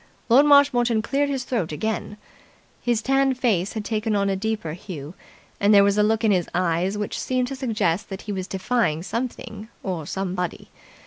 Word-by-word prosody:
Lord 275 Hz, +6 st, +6 dB
Marshmoreton 245 Hz, -6 st, +4 dB
cleared 280 Hz, +4 st, 0 dB
his 270 Hz, -2 st, -2 dB
throat 230 Hz, -11 st, -2 dB
again. 210 Hz, +5 st, -3 dB, 0.6 s
His 235 Hz, -2 st, 0 dB
tanned 270 Hz, -1 st, +2 dB
face 205 Hz, -8 st, +1 dB
had 215 Hz, -2 st, -4 dB
taken 215 Hz, 0 st, -1 dB
on 200 Hz, -1 st, +1 dB
a -, -, 0 dB
deeper 210 Hz, -5 st, -3 dB
hue, 165 Hz, -4 st, -8 dB, 0.5 s
and 205 Hz, +1 st, +5 dB
there 200 Hz, -, +8 dB
was 200 Hz, 0 st, +3 dB
a 210 Hz, -, +3 dB
look 220 Hz, +2 st, +2 dB
in 220 Hz, -, +4 dB
his 180 Hz, -3 st, +1 dB
eyes 180 Hz, +2 st, 0 dB
which 210 Hz, -1 st, -3 dB
seemed 255 Hz, -1 st, 0 dB
to 270 Hz, -, -4 dB
suggest 215 Hz, -7 st, -1 dB
that 195 Hz, -1 st, -7 dB
he 210 Hz, -, -5 dB
was 190 Hz, -2 st, -4 dB
defying 190 Hz, -5 st, 0 dB
something 220 Hz, 0 st, -5 dB
or 170 Hz, -6 st, -4 dB
somebody. 180 Hz, -2 st, -4 dB
210 Hz, 185 wpm, -23 LUFS, 190-240 Hz, 0.6 s, there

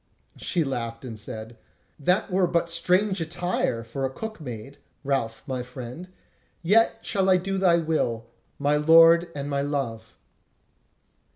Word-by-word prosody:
She 175 Hz, -3 st, 0 dB
laughed 115 Hz, -3 st, -4 dB
and 115 Hz, -3 st, -7 dB
said: 110 Hz, +2 st, -8 dB, 0.4 s
"That 180 Hz, +7 st, +1 dB
were 185 Hz, 0 st, +3 dB
but 170 Hz, 0 st, 0 dB
strange 180 Hz, +3 st, +2 dB
attire 165 Hz, -8 st, -1 dB
for 125 Hz, +4 st, -5 dB
a 135 Hz, -, +1 dB
cook 215 Hz, +7 st, -7 dB
maid, 125 Hz, 0 st, -8 dB, 0.2 s
Ralph, 135 Hz, -5 st, -2 dB
my 130 Hz, -3 st, -3 dB
friend; 125 Hz, +7 st, -8 dB, 0.5 s
yet 225 Hz, +5 st, +3 dB
shall 195 Hz, -2 st, +1 dB
I 185 Hz, -, +6 dB
do 195 Hz, +1 st, -2 dB
thy 180 Hz, -3 st, +4 dB
will, 155 Hz, -9 st, -1 dB, 0.3 s
my 145 Hz, +1 st, +2 dB
lord 165 Hz, +2 st, +6 dB
and 140 Hz, -1 st, -4 dB
my 140 Hz, -1 st, -1 dB
love." 135 Hz, -6 st, -4 dB
150 Hz, 145 wpm, -25 LUFS, 125-180 Hz, 0.5 s, I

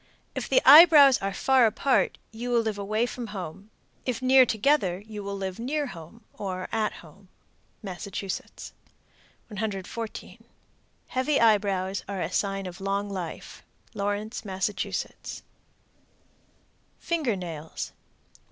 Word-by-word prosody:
If -, -, -4 dB
the -, -, +4 dB
eyebrows 295 Hz, -3 st, +9 dB
are 195 Hz, 0 st, -2 dB
far 260 Hz, +3 st, +4 dB
apart, 260 Hz, +5 st, +1 dB
you 235 Hz, +3 st, -6 dB
will 240 Hz, -1 st, +3 dB
live 220 Hz, -2 st, -3 dB
away 215 Hz, +3 st, 0 dB
from 245 Hz, -1 st, -6 dB
home; 190 Hz, +3 st, -8 dB, 0.3 s
if 250 Hz, -3 st, -2 dB
near 260 Hz, 0 st, +6 dB
together, 220 Hz, -5 st, +2 dB
you 210 Hz, -2 st, -7 dB
will 200 Hz, 0 st, -4 dB
live 190 Hz, +1 st, -5 dB
near 290 Hz, +5 st, -1 dB
home, 190 Hz, -, -11 dB
or 185 Hz, -2 st, -5 dB
at 220 Hz, -1 st, 0 dB
home. 190 Hz, +5 st, -18 dB, 0.6 s
Massachusetts. 195 Hz, 0 st, -6 dB, 0.8 s
114. 215 Hz, +1 st, -5 dB, 0.7 s
Heavy 260 Hz, +3 st, +1 dB
eyebrows 200 Hz, -4 st, +2 dB
are 200 Hz, -1 st, -3 dB
a 170 Hz, 0 st, -2 dB
sign 195 Hz, 0 st, -1 dB
of 180 Hz, +1 st, -8 dB
long 200 Hz, +1 st, -2 dB
life. 180 Hz, -4 st, -6 dB, 0.3 s
Lawrence, 205 Hz, +2 st, -3 dB
Mass. 190 Hz, 0 st, -1 dB, 2.3 s
FINGER 310 Hz, -10 st, -1 dB
NAILS. 165 Hz, -4 st, -6 dB
115. -, -, -33 dB
205 Hz, 125 wpm, -26 LUFS, 190-240 Hz, 2.3 s, eyebrows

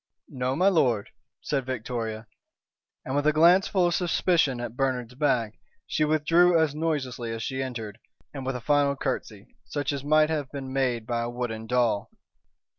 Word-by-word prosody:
"No, 130 Hz, 0 st, -2 dB
m'lord," 150 Hz, -, +2 dB, 0.3 s
said 135 Hz, -3 st, -2 dB
Victoria, 115 Hz, -3 st, -4 dB, 0.8 s
and, 130 Hz, -, -3 dB
with 145 Hz, +1 st, +1 dB
a -, -, +6 dB
glance 170 Hz, +5 st, +5 dB
full 185 Hz, -3 st, +2 dB
of 175 Hz, -, +1 dB
suspicion 170 Hz, -6 st, +1 dB
at 120 Hz, -1 st, -5 dB
Bernard's 125 Hz, -3 st, -1 dB
back, 125 Hz, -6 st, 0 dB, 0.3 s
she 155 Hz, -, 0 dB
withdrew 165 Hz, +3 st, +4 dB
as 160 Hz, -3 st, +2 dB
noiselessly 140 Hz, -7 st, -2 dB
as 115 Hz, 0 st, -4 dB
she 135 Hz, +1 st, -3 dB
entered, 115 Hz, -5 st, -5 dB, 0.3 s
and 135 Hz, -2 st, -6 dB
with 130 Hz, 0 st, -2 dB
a 125 Hz, -, -5 dB
final 145 Hz, +1 st, +2 dB
curtsey, 115 Hz, -7 st, -4 dB, 0.2 s
such 145 Hz, +7 st, -3 dB
as 140 Hz, -1 st, -4 dB
might 155 Hz, +1 st, +3 dB
have 145 Hz, -4 st, -2 dB
been 135 Hz, -2 st, -6 dB
made 125 Hz, -4 st, 0 dB
by 120 Hz, 0 st, -1 dB
a 120 Hz, -, -2 dB
wooden 115 Hz, -2 st, -4 dB
doll. 120 Hz, -4 st, +1 dB
130 Hz, 170 wpm, -26 LUFS, 120-150 Hz, 0.8 s, a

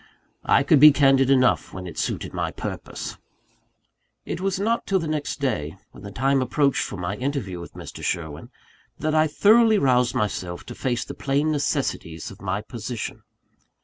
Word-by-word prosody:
I -, -, +5 dB
could 145 Hz, 0 st, +4 dB
be 150 Hz, +2 st, +10 dB
candid 135 Hz, -2 st, +4 dB
enough 130 Hz, -2 st, +3 dB
when 95 Hz, -1 st, -6 dB
it 85 Hz, -, -8 dB
suited -, -, -3 dB
my -, -, -1 dB
purpose! -, -, -6 dB, 1.1 s
It -, -, -4 dB
was 195 Hz, 0 st, -1 dB
not 230 Hz, +3 st, 0 dB
till 195 Hz, -, +2 dB
the 165 Hz, -3 st, -2 dB
next 155 Hz, -1 st, -3 dB
day, 85 Hz, -, -2 dB
when -, -, -14 dB
the 100 Hz, -, -8 dB
time 135 Hz, +5 st, +1 dB
approached 140 Hz, +2 st, +1 dB
for 100 Hz, -, -4 dB
my 90 Hz, +2 st, -3 dB
interview 125 Hz, -9 st, -3 dB
with 85 Hz, -, -10 dB
Mr. -, -, -9 dB
Sherwin, 80 Hz, -4 st, -3 dB, 0.5 s
that 155 Hz, +1 st, -1 dB
I 155 Hz, 0 st, +4 dB
thoroughly 220 Hz, +7 st, +5 dB
roused 125 Hz, -6 st, +2 dB
myself 95 Hz, -6 st, -2 dB
to -, -, -8 dB
face 120 Hz, -2 st, -2 dB
the -, -, -7 dB
plain 140 Hz, +3 st, 0 dB
necessities 85 Hz, -, -2 dB
of 100 Hz, -, -14 dB
my 100 Hz, +1 st, -2 dB
position. 120 Hz, 0 st, -6 dB
135 Hz, 175 wpm, -24 LUFS, 100-150 Hz, 1.1 s, be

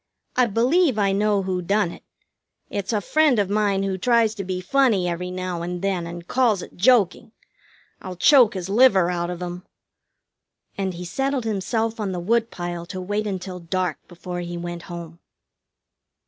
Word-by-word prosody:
I 250 Hz, -1 st, +4 dB
believe 255 Hz, -, +2 dB
I 200 Hz, -2 st, +2 dB
know 205 Hz, 0 st, +1 dB
who 185 Hz, -1 st, -2 dB
done 200 Hz, 0 st, +1 dB
it. -, -, -12 dB, 0.7 s
It's 200 Hz, +1 st, -3 dB
a 210 Hz, -2 st, 0 dB
friend 305 Hz, +3 st, +3 dB
of 200 Hz, -2 st, 0 dB
mine 205 Hz, -2 st, +1 dB
who 190 Hz, -1 st, -2 dB
tries 230 Hz, 0 st, +3 dB
to 205 Hz, -3 st, -5 dB
be 185 Hz, 0 st, -3 dB
funny 220 Hz, -3 st, +2 dB
every 175 Hz, +1 st, -3 dB
now 185 Hz, -1 st, -4 dB
and 175 Hz, +1 st, -4 dB
then, 185 Hz, -4 st, -1 dB
and 170 Hz, 0 st, -8 dB
calls 230 Hz, -8 st, +2 dB
it -, -, -12 dB
joking. 215 Hz, 0 st, +2 dB, 0.7 s
I'll 185 Hz, -1 st, -7 dB
choke 245 Hz, -, +5 dB
his 185 Hz, -2 st, -4 dB
liver 195 Hz, -5 st, +4 dB
out 175 Hz, -1 st, -2 dB
of 180 Hz, 0 st, -5 dB
him!" 175 Hz, 0 st, -6 dB, 1.1 s
And 190 Hz, -2 st, -2 dB
he 180 Hz, +1 st, -7 dB
settled 270 Hz, +7 st, -1 dB
himself 225 Hz, +2 st, -1 dB
on 200 Hz, -3 st, -2 dB
the 180 Hz, -, -3 dB
woodpile 175 Hz, -4 st, -2 dB
to 185 Hz, -, -6 dB
wait 205 Hz, +3 st, -2 dB
until 185 Hz, -2 st, -5 dB
dark 180 Hz, -1 st, -2 dB
before 175 Hz, +1 st, -7 dB
he 175 Hz, 0 st, -5 dB
went 175 Hz, 0 st, -5 dB
home. 170 Hz, -1 st, -8 dB
190 Hz, 175 wpm, -23 LUFS, 175-220 Hz, 1.1 s, choke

